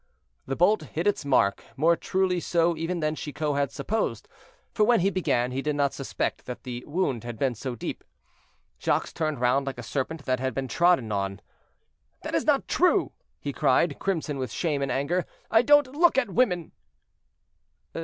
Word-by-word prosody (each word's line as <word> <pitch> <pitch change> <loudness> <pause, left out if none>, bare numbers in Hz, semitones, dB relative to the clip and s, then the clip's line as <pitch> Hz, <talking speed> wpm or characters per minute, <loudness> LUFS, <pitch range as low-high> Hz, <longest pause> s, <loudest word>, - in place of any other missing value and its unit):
The 135 - -2
bolt 185 +4 +3
hit 155 +3 -4
its 205 -5 +1
mark, 115 -8 +2
more 165 +4 +4
truly 185 0 0
so 170 0 +1
even 165 +2 -3
than 155 0 0
Chicot 150 0 -3
had 140 -1 0
supposed; 165 +11 -2 0.5
for 215 - +2
when 235 -2 +4
he 195 +3 +2
began, 135 -10 0
he 130 +2 -2
did 150 +1 -1
not 140 -1 +1
suspect 135 - -3
that 125 - -7
the 125 -1 -6
wound 145 -8 -1
had 120 -1 -6
been 130 +1 +1
so 125 +2 -5
deep. 110 - -5 0.8
Jacques - - 0
turned 155 -5 -2
round 125 +3 +2
like 135 - -4
a 120 - -7
serpent 140 +4 -3
that 130 -1 0
had 130 -1 -2
been 135 -1 -2
trodden 170 -5 +2
on. 100 -1 -2 0.8
"That - - -5
is - - +1
not - - +2
true," - - +2 0.3
he 140 - -4
cried, 145 +4 +2
crimson 160 -7 -2
with 130 -4 -3
shame 150 -2 -1
and 135 -1 -1
anger, 145 +8 0 0.3
"I 225 - +6
don't 290 0 +4
look 335 -3 +4
at 270 - +1
women." 180 -8 +1
150 Hz, 185 wpm, -26 LUFS, 130-180 Hz, 0.8 s, I